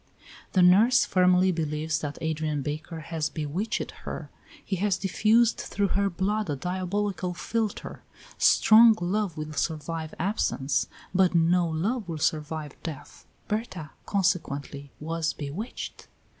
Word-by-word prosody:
The 185 - +5
nurse 210 +8 +6
firmly 185 0 +4
believes 155 -1 -1
that 145 -1 -5
Adrian 155 -2 -1
Baker 155 +3 -5
has 160 -1 -2
bewitched 160 +9 -3
her; - - -6 0.3
he 190 - -2
has 195 0 +1
diffused 220 +4 +3
through 200 -1 -1
her 200 +1 +1
blood 200 +2 -1
a 145 - 0
diabolical 185 +3 -2
philtre. 220 +3 -3 0.4
Strong 225 0 +7
love 185 -1 -1
will 155 0 -5
survive 160 +1 -3
absence, 165 -7 0 0.3
but 185 -1 +3
no 170 +1 +3
love 195 +6 -2
will 165 - -3
survive 155 -1 -2
death. 145 -3 -8 0.2
Berta, 210 -8 -4 0.2
consequently, 145 -7 -1
was 160 +1 -2
bewitched. 155 - -6
175 Hz, 125 wpm, -27 LUFS, 155-200 Hz, 0.4 s, Strong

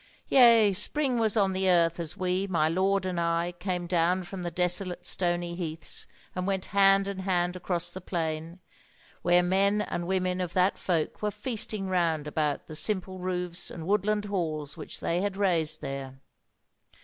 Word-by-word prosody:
"Yea, 230 -6 +7
spring 260 +5 0
was 220 -1 +1
on 195 -2 +3
the 190 0 +1
earth, 170 -1 +3
as 165 -2 -5
we, 185 +1 0
my 165 -5 +2
lord 190 +3 +1
and 180 -2 -2
I, 170 +1 0
came 180 -1 -2
down 175 +1 +1
from 185 +1 -7
the 175 - -2
desolate 180 +1 -1
stony 175 -1 -1
heaths, 165 -2 -5 0.3
and 185 0 -3
went 190 -1 -1
hand 195 0 +5
and 195 -1 -4
hand 180 -1 0
across 175 -1 -2
the 185 - -8
plain, 165 0 -3 0.6
where 175 0 +4
men 195 +3 +2
and 175 -4 -3
women 185 -1 0
of 175 -1 -3
that 185 +1 +3
folk 165 -4 -1
were 210 - +1
feasting 215 -3 -2
round 170 -5 +1
about 150 -1 -1
the 155 - -9
simple 185 +1 -1
roofs 180 -1 -3
and 160 - -7
woodland 210 +2 +1
halls 155 -7 -3
which - - -8
they 170 +2 0
had 200 -1 -2
raised 175 -6 +1
there. 135 -1 -5
180 Hz, 175 wpm, -28 LUFS, 170-195 Hz, 0.6 s, Yea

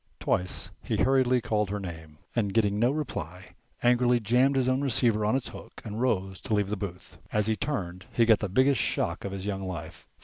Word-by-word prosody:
Twice 90 +1 -1
he - - -2
hurriedly 130 -1 +3
called 105 -4 0
her 105 +1 -2
name, 80 -5 -8 0.2
and, 105 -4 0
getting 105 -2 +2
no 120 +2 +4
reply, 95 - -5 0.3
angrily 120 0 +4
jammed 125 +5 +3
his 130 -2 +2
own 130 +1 +2
receiver 120 -5 +2
on 105 +4 +2
its 135 - -2
hook - - -11
and 110 +1 -4
rose 95 -7 0
to 110 - -1
leave 100 -1 +1
the 105 - -1
booth. 95 -3 -7
As 105 -1 +1
he 110 0 +1
turned 95 -11 -4
he 115 - +3
got 110 -2 +5
the 105 - -2
biggest 130 +8 +3
shock - - -1
of 100 - -4
his 95 0 -5
young 100 -1 -2
life. 85 -4 -7
105 Hz, 210 wpm, -28 LUFS, 95-125 Hz, 0.3 s, got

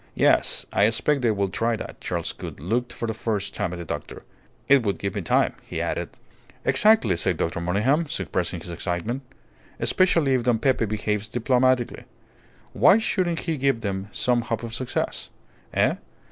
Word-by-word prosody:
"Yes, - - +3
I 100 - +4
expect 130 +6 +1
they 120 - +2
will 100 -2 0
try 115 +5 0
that." - - -8
Charles - - -2
Gould - - -8
looked 120 - -1
for 120 - -4
the 110 - -1
first 105 -2 -2
time 100 -4 -2
at 90 - -5
the 85 - -6
doctor. - - -6 0.4
"It 140 -1 +6
would 100 -3 0
give 100 -2 -3
me - - -2
time," - - +2
he - - -6
added. - - -2 0.6
"Exactly," 210 - +4
said 90 0 +1
Dr. 85 +1 -2
Monygham, 115 - +1
suppressing 90 - -2
his 85 - -8
excitement. 90 +9 -3 0.6
"Especially 165 -7 +3
if 130 - +2
Don 120 -1 +2
Pepe 125 0 +2
behaves 105 0 -2
diplomatically. 125 +1 +1 0.7
Why 200 - +6
shouldn't 185 -6 0
he 165 -3 -2
give 135 -3 +1
them 95 -2 -3
some 125 -1 +1
hope 115 -1 -3
of 115 -1 -6
success? 125 +1 -2 0.4
Eh? - - +2
115 Hz, 175 wpm, -24 LUFS, 100-130 Hz, 0.7 s, It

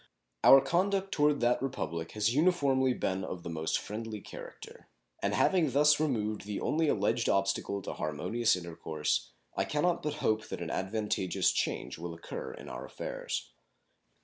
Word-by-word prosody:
Our 135 - +9
conduct 190 +6 +1
toward 145 -2 +2
that 120 +1 +2
Republic 85 - -3
has 105 -1 -2
been 120 +4 +3
uniformly 135 -7 +3
of 95 -2 -2
the 85 - -5
most 80 -1 0
friendly 110 0 -5
character, - - -11 0.3
and - - 0
having 175 -6 +3
thus 145 +2 +5
removed 110 -9 -1
the 105 -1 -3
only 160 +1 +1
alleged 110 -1 +1
obstacle 100 0 0
to - - -4
harmonious 90 +10 0
intercourse, 80 -3 -2 0.3
I - - +1
can 150 0 -1
not 175 -1 +2
but 150 0 -2
hope 110 -7 0
that - - -5
an 80 - -4
advantageous 95 -2 0
change - - -2
will 85 0 -5
occur 85 - -6
in - - -10
our - - -6
affairs. - - -5
110 Hz, 160 wpm, -31 LUFS, 95-145 Hz, 0.3 s, Our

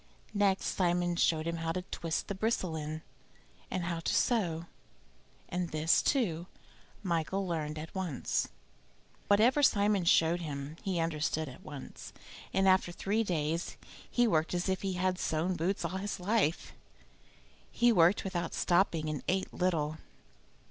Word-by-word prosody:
Next 200 -2 +2
Simon 175 -1 +1
showed 160 -2 +2
him 170 0 -2
how 165 0 -2
to 180 - -3
twist 165 -2 -3
the - - -2
bristle 190 -4 -1
in, 155 +1 -5 0.7
and 185 - -2
how 170 -1 -2
to 165 - -1
sew, 175 -9 +1 0.8
and 180 -1 -2
this, 155 +2 +3
too, 180 - 0 0.6
Michael 185 +2 0
learned 155 -3 -2
at 155 +1 -7
once. 180 -8 -1 0.8
Whatever 230 +8 +5
Simon 205 -7 +3
showed 170 +1 +4
him 145 -1 -5
he 185 -3 -1
understood 160 -1 -1
at 130 - -10
once, 145 -3 -9 0.4
and 195 0 +2
after 185 -2 +4
three 205 +5 0
days 165 -3 -2 0.3
he 245 - +3
worked 165 -3 +1
as 175 +2 -1
if 190 0 0
he 195 -1 -1
had 185 0 0
sewn 165 +4 0
boots 175 +4 -1
all 190 - -2
his 205 +1 -4
life. 180 -4 0 1.0
He 240 0 +3
worked 180 -1 +4
without 175 -3 -3
stopping, 175 -3 +2
and 155 -2 -2
ate 190 +1 0
little. 160 -4 0
175 Hz, 150 wpm, -31 LUFS, 160-190 Hz, 1.0 s, Whatever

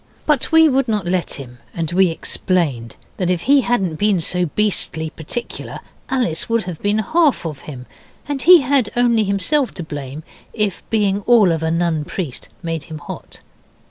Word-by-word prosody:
But 300 -2 +1
we 320 0 +7
would 270 -2 +1
not 210 -4 -1
let 180 0 0
him, 125 -3 -8 0.2
and 165 -1 -3
we 185 +1 +4
explained 160 - -1 0.2
that 180 -2 -1
if 180 -2 0
he 275 +7 +4
hadn't 195 -10 -1
been 205 -1 +2
so 180 +2 +1
beastly 160 -4 0
particular 200 +10 -6 0.3
Alice 245 -12 0
would 230 -1 +1
have 175 -3 -7
been 205 +1 +1
half 305 - +1
of 150 -4 -5
him, 125 -4 -8 0.4
and 285 -2 -2
he 350 +1 +8
had 260 -4 +1
only 235 -3 +3
himself 200 +8 0
to 175 - -5
thank 145 -1 -7 0.3
if 210 -4 -1
being 205 -2 +1
all 225 -7 +5
of 160 -1 -1
a 160 - 0
Nun 165 -2 0
Priest 165 -4 -4
made 165 -2 -3
him 160 -2 -8
hot. 150 - -9
185 Hz, 175 wpm, -19 LUFS, 160-240 Hz, 0.4 s, he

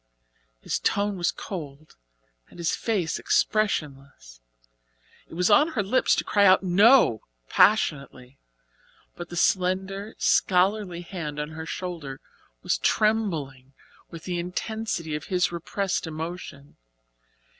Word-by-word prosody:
His - - -2
tone 205 0 0
was 175 -2 0
cold 155 -5 -8 0.5
and - - -16
his 170 -1 -1
face 195 -8 -2
expressionless. 140 - -1 0.9
It - - -12
was 180 +4 +1
on 300 +9 +4
her 215 - 0
lips 255 +7 +2
to - - -1
cry 205 - +2
out 190 0 +6
"No," 195 - +5 0.3
passionately. 140 -10 +1 0.8
But 175 0 -8
the 175 - -8
slender, 190 +3 0
scholarly 185 -1 +1
hand 165 -5 -6
on 150 0 -3
her 160 0 -8
shoulder 165 -9 -6 0.4
was - - 0
trembling 160 -12 0 0.4
with 165 -1 -10
the 180 -2 -3
intensity 180 -1 -4
of 150 - -6
his 180 -2 0
repressed 180 +2 -3
emotion. 160 -3 -7
175 Hz, 120 wpm, -25 LUFS, 150-200 Hz, 0.9 s, out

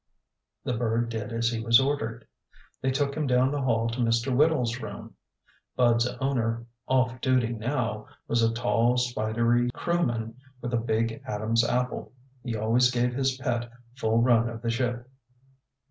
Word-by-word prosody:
The 125 - -1
bird 115 0 0
did 110 0 -4
as 115 0 0
he 115 - -2
was 115 0 +6
ordered. 120 -4 -2 0.6
They 130 - +1
took 140 +1 0
him 150 0 -2
down 125 +1 +3
the 145 -1 -1
hall 115 -3 +1
to 115 +2 -5
Mr. 115 +2 +1
Whittle's 130 -5 +2
room. - - -8 0.6
Bud's 120 -1 +3
owner, 115 -4 -1 0.2
off 130 -1 +1
duty 130 -3 +2
now, 115 -2 -2 0.2
was 115 - +1
a 115 0 +3
tall, 115 +1 +1
spidery 120 0 +1
crewman 120 -10 -1 0.2
with 120 -1 -5
a - - +3
big 115 +1 -1
Adam's 110 +1 +1
apple. 125 +1 -2 0.3
He 120 -3 -3
always 115 +4 +3
gave 125 0 0
his 130 0 0
pet 120 -2 -2 0.3
full 115 -3 +1
run 120 -1 +4
of 115 0 -8
the 115 - 0
ship. 120 0 -2
120 Hz, 160 wpm, -27 LUFS, 115-125 Hz, 0.6 s, was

